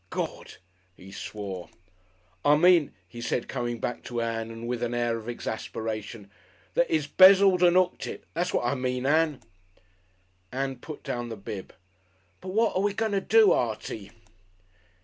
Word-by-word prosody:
"Gord!" - - -5 0.4
he 95 +2 -13
swore. 95 -3 -6 0.7
"I 145 - +5
mean," 175 -2 +5 0.2
he 120 +6 -10
said, 120 - -2
coming 120 -1 -3
back 120 - -3
to 120 -1 -3
Ann 115 -1 -2
and 115 +1 -7
with 120 -1 -3
an 120 0 -1
air 120 -1 0
of 110 +1 -8
exasperation, 110 -2 -5 0.4
"that 170 - +2
he's 155 -3 +1
'bezzled 190 +2 +7
and 175 0 +5
'ooked 185 -1 +1
it. - - -7
That's 175 +2 -1
what - - 0
I 120 - +1
mean, 125 -1 -2
Ann." 155 0 +2 1.1
Ann 135 0 -2
put 150 +3 -9
down 120 -1 -4
the 115 - -6
bib. 100 -1 -7 0.7
"But 190 - -11
wot 220 +4 +1
are 185 - +2
we 205 0 0
going 220 0 0
to 200 -1 +1
do, 220 +1 +5
Artie?" 110 -3 -2
125 Hz, 165 wpm, -27 LUFS, 115-175 Hz, 1.1 s, bezzled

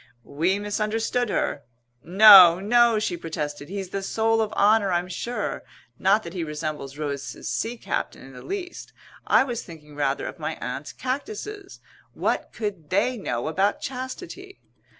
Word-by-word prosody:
We 170 +7 0
misunderstood 215 +3 -1
her. 185 - -1 0.4
"No, 185 -2 +9
no," 235 +3 +4
she 210 -4 -1
protested, 150 -3 -5
"he's 195 -1 -5
the 195 - -3
soul 225 +3 +1
of 215 - -1
honour 205 -1 +3
I'm 175 0 0
sure 210 +4 -4 0.4
not 200 +3 +3
that 170 - -8
he 180 -3 -3
resembles 150 -3 -5
Rose's 140 -2 -5
sea 235 +2 -2
captain - - -4
in 135 - -13
the 125 - -11
least. 380 -2 -6 0.3
I - - +5
was 240 -4 -4
thinking 150 -3 -13
rather 140 -1 -1
of - - -7
my - - -3
Aunt's - - -6
cactuses. 390 +10 -6 0.3
What - - -1
could 195 -9 -5
they 225 +7 +1
know 125 - -3
about 195 +6 +1
chastity?" 340 +10 -7
200 Hz, 150 wpm, -24 LUFS, 160-235 Hz, 0.4 s, No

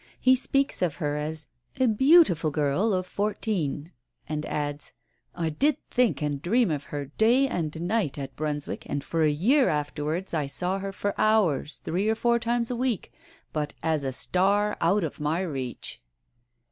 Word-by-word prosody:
He 255 0 +5
speaks 275 +1 +1
of 175 -5 +1
her 150 -4 -2
as 150 +1 -3 0.3
a 260 - +4
"beautiful 235 - +5
girl 150 +8 +1
of 185 -2 0
fourteen," 185 -7 -2 0.4
and 155 -1 -3
adds, 145 -1 -3 0.4
"I 165 -2 -1
did 285 - +2
think 245 -10 +2
and 145 -2 -2
dream 225 +3 +2
of 145 -1 -3
her 145 -1 -5
day 245 +5 +5
and 160 - -3
night 185 -6 0
at 135 -1 -6
Brunswick, 150 -1 -3
and 145 -1 -3
for 165 - -1
a 155 - +4
year 240 - +3
afterwards 150 +4 -2
I 150 -4 0
saw 180 +7 -2
her 195 0 -4
for 200 +1 -2
hours 185 -10 +2
three 195 +6 0
or 220 - +2
fours 235 +1 +1
times 235 0 0
a - - -1
week, 245 -4 -2 0.4
but 150 -1 -2
as 160 -3 +1
a 135 - -1
star 200 +9 +2
out 185 +4 +3
of 155 - -4
my 150 +4 0
reach." 135 -9 -5
175 Hz, 170 wpm, -26 LUFS, 150-220 Hz, 0.4 s, He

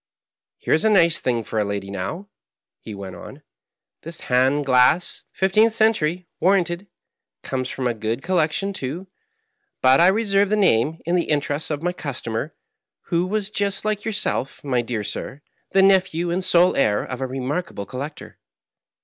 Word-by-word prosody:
Here - - -1
is 160 - +3
a 220 - +4
nice 170 -6 +4
thing 120 -2 -1
for 110 - -3
a - - +2
lady, 100 -1 -4
now," 130 - -5 0.5
he 110 - -9
went 95 -2 -8
on, 85 - -11 0.6
"this 165 +1 -9
hand 130 +3 +2
glass 130 +6 +3
— - - -26
^fifteenth 215 +4 +3
century, 180 -6 +1
warranted 180 0 +1 0.3
— - - -65
comes 130 -1 -3
from 130 - -4
a 120 - +1
good 110 +4 -3
collection, 175 +2 0
too; 160 +3 -5 0.7
but 130 +1 +5
I 170 - +6
reserve 200 -1 +2
the 215 - +2
name, 160 - +2
in 170 +2 +1
the 175 - +1
interests 150 0 -1
of 150 0 -3
my 175 0 0
customer, 135 -3 -4 0.5
who 175 +1 +1
was 210 +1 -2
just 200 0 -2
like 215 -1 -1
yourself, 205 - -2
my 130 -4 0
dear 115 -2 -3
sir, 140 +7 -6 0.3
the 195 - +4
nephew 185 -3 +3
and 185 +2 -1
sole 180 0 +4
heir 105 -6 +2
of 125 0 -6
a 130 - -1
remarkable 135 - -4
collector." 140 +8 -8
155 Hz, 170 wpm, -22 LUFS, 125-190 Hz, 0.7 s, I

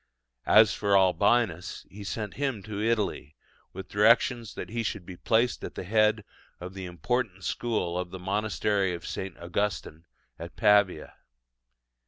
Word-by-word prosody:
As 110 0 +6
for 100 -1 +2
Albinus, 95 0 +1
he 100 +1 -9
sent 105 0 -4
him 135 -8 -2
to 105 0 -5
Italy, 105 -9 -1 0.4
with 95 +1 -8
directions 115 +2 +3
that - - -6
he 115 +1 -2
should 100 -4 -4
be 90 - -9
placed 115 +6 +1
at - - -7
the - - -5
head 110 +2 +2 0.4
of 90 +1 -8
the 95 -1 -6
important 95 - -2
school 90 -8 -2
of 90 -1 -4
the 95 - -7
monastery 100 0 0
of 85 - -9
St. 95 -2 -5
Augustine 85 -2 -3 0.3
at - - -8
Pavia. 100 -6 +3
100 Hz, 150 wpm, -27 LUFS, 90-110 Hz, 0.4 s, As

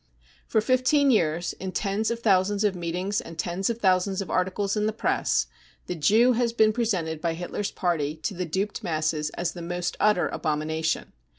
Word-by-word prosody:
For 220 - +2
fifteen 255 +4 +3
years, 170 -5 +1
in 190 -1 -6
tens 205 +2 0
of 235 0 -3
thousands 200 -1 +2
of 205 -2 +2
meetings 180 +4 -2
and 165 -1 -10
tens 175 +5 -1
of 230 - -1
thousands 190 -2 +2
of 195 - -4
articles 190 +2 0
in 210 0 +1
the 215 - -1
press, 220 - +1 0.4
the - - -3
Jew 215 +10 +4
has 240 -1 +1
been 220 -2 +4
presented 180 -9 -1
by 165 0 -1
Hitler's 180 +4 -3
Party 155 -5 -1
to - - -1
the 180 -1 -4
duped 195 +5 -2
masses 155 -2 -1
as 175 - -1
the 175 - -8
most 175 +1 -3
utter 210 -4 +3
abomination. 160 +1 -2
185 Hz, 185 wpm, -26 LUFS, 170-215 Hz, 0.4 s, Jew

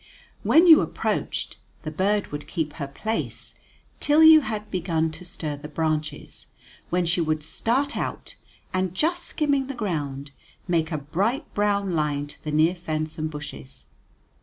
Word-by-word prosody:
When 330 +3 +5
you 320 -3 +9
approached, - - -2 0.3
the 155 - -4
bird 200 +5 0
would 145 0 -6
keep 155 -3 -2
her 140 -4 -5
place 220 +11 -4 0.5
till 300 +2 +4
you 315 -1 +9
had 215 -4 -5
begun 165 -3 0
to 170 - -10
stir 160 -5 -5
the 145 +1 -8
branches, 155 -1 -3 0.4
when 180 0 +1
she 170 +1 +1
would 155 -1 0
start 255 - 0
out, - - -4 0.4
and, 185 -1 -1
just 345 - +1
skimming 280 -3 0
the 275 - -5
ground, 145 - -3 0.4
make 165 -2 +1
a 155 - 0
bright 195 - -2
brown 200 -2 +1
line 150 -2 0
to 145 - -11
the 150 - -3
near 155 +3 +4
fence 155 -2 -4
and 155 0 -1
bushes. 70 - -8
170 Hz, 160 wpm, -25 LUFS, 150-210 Hz, 0.5 s, you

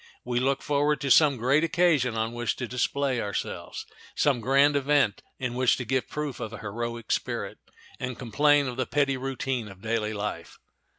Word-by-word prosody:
We 120 0 0
look 135 +2 0
forward 145 0 +1
to 140 -2 0
some 145 -2 +6
great 130 +7 +2
occasion 165 -8 +2
on 110 +1 -1
which 120 -2 -1
to 125 - -4
display 125 +1 0
ourselves, 100 -1 -4 0.3
some 135 -5 +2
grand 140 +4 +4
event 140 -6 +2 0.2
in 125 -2 -3
which 125 0 +2
to 125 - -4
give 130 +2 -1
proof 150 -3 -4
of 110 - -5
a - - -6
heroic 115 +2 -5
spirit, - - -2 0.4
and 125 -1 -4
complain 145 +4 +3
of 125 -1 -5
the 130 - -1
petty 140 -2 +1
routine 130 -2 -3
of 95 -1 -13
daily 110 -1 -1
life. 100 -5 -5
130 Hz, 180 wpm, -27 LUFS, 115-140 Hz, 0.4 s, some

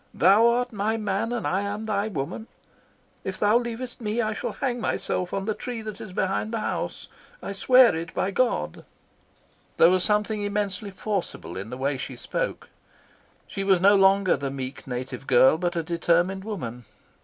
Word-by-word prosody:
Thou 195 - +6
art 245 +1 +1
my 215 +2 0
man 215 +1 -1
and 240 -2 -2
I 190 +2 +1
am 205 +2 -4
thy 210 -1 0
woman. 215 +4 -4 0.8
If 190 - -4
thou 210 +3 +4
leavest 240 +1 -6
me 215 +1 -2
I 215 -2 0
shall - - -4
hang 245 -4 -2
myself 180 -4 -2
on 195 - -2
the 215 - 0
tree 235 0 -5
that 215 -2 -7
is 210 - -8
behind 190 +4 -1
the 230 - -1
house. - - -3 0.3
I - - -5
swear 250 +1 +6
it 165 0 -5
by 195 - 0
God." 250 +4 0 0.9
There 165 - +7
was 185 -1 +3
something 210 +1 +1
immensely 205 -1 -2
forcible 185 - -4
in 100 +4 -6
the 125 - -6
way 135 +1 -1
she - - -6
spoke. - - -4 0.8
She 195 -1 -4
was 195 -2 +4
no 200 +3 +6
longer 195 -1 +4
the 140 0 -3
meek, 135 0 -5
soft - - -19
native 130 +1 -5
girl, 130 +4 +5
but 175 0 -1
a 165 - -1
determined 175 +3 +1
woman. 125 - -5
200 Hz, 185 wpm, -25 LUFS, 170-220 Hz, 0.9 s, There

